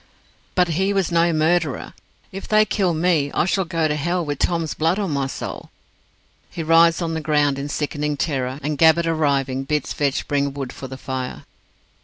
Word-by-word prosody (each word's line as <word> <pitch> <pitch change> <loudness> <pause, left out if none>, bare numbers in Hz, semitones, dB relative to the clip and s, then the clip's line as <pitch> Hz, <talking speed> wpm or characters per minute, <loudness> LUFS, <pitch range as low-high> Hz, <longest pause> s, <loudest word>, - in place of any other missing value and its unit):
"But 180 -1 +3
he 190 +5 +1
was 195 -3 0
no 170 0 +3
murderer. 160 -2 0 0.4
If 195 +1 -7
they 215 0 +4
kill 185 -6 0
me, 160 -4 +1
I - - +2
shall 190 0 0
go 165 -1 0
to 150 - -1
hell 175 +3 -1
with 145 -2 -3
Tom's 165 -3 0
blood 165 +4 +1
on 200 -5 -2
my 140 -2 0
soul." - - -6 0.8
He 165 - -5
writhes 165 +2 +4
on 165 -1 -2
the 160 - -2
ground 150 -2 +1
in 140 +1 -4
sickening 150 0 -2
terror, 135 -3 -2
and 150 0 -2
Gabbett 165 +1 +5
arriving, 140 -5 0
bids 150 0 -2
Vetch 140 -2 -1
bring 140 -1 0
wood 135 -2 -5
for 135 - -8
the 130 0 -8
fire. 130 -1 -5
155 Hz, 190 wpm, -21 LUFS, 140-170 Hz, 0.8 s, Gabbett